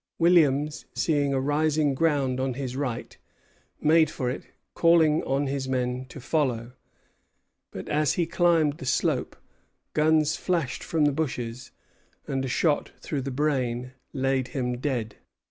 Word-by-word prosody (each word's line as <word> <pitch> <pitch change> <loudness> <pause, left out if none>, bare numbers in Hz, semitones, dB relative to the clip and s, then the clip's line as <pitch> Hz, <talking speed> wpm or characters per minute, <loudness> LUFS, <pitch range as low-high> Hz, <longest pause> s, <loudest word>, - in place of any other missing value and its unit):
Williams, 155 -4 +3
seeing 145 -3 +1
a 135 - +1
rising 145 +1 +1
ground 135 -3 +1
on 130 -1 -1
his 130 -2 -4
right, 130 -4 -4 0.6
made 160 0 +4
for 125 -4 -2
it, 130 - -7 0.3
calling 165 -2 +4
on 135 +2 0
his 135 -1 -3
men 125 0 -1
to 140 - -9
follow; 125 -5 -1 1.0
but - - -8
as 150 -1 +2
he 175 - +1
climbed 165 -3 +2
the - - -7
slope, - - 0 0.6
guns 155 0 +3
flashed 165 -10 -1
from 160 -2 +1
the 145 - +4
bushes, 130 -5 -3 0.6
and 135 -1 -2
a - - -2
shot 145 +4 +1
through 145 -3 -3
the 135 - -4
brain 130 -3 -1 0.2
laid 135 -1 0
him 125 -4 -2
dead. 125 -6 -2
140 Hz, 145 wpm, -26 LUFS, 130-155 Hz, 1.0 s, made